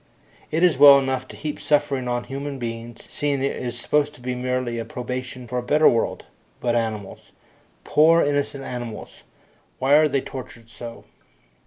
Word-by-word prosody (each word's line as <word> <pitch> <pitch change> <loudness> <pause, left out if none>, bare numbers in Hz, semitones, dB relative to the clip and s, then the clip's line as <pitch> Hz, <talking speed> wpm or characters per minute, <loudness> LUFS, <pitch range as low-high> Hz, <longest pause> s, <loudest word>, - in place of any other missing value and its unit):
It 160 +3 0
is 170 -7 +4
well 140 -1 +10
enough 130 -1 -1
to - - -11
heap 150 0 -5
suffering 145 -4 +1
on 120 0 -1
human 140 +1 -5
beings, 115 -1 -6
seeing 140 -2 -1
it 140 - 0
is 120 -1 -5
supposed 150 +3 0
to - - -17
be 125 +1 -3
merely 125 -1 -2
a - - -2
probation 125 +1 -6
for 125 +1 -2
a - - -3
better 150 +5 +4
world, 115 - +1 0.3
but 120 -1 0
animals 110 -4 -3 0.5
poor, 165 +2 +5
innocent 145 -1 -1
animals 120 -4 -7 0.6
why 140 - +2
are 155 +1 +6
they 140 -2 0
tortured 120 -4 -9
so? 120 -2 -9
130 Hz, 170 wpm, -23 LUFS, 120-145 Hz, 0.6 s, well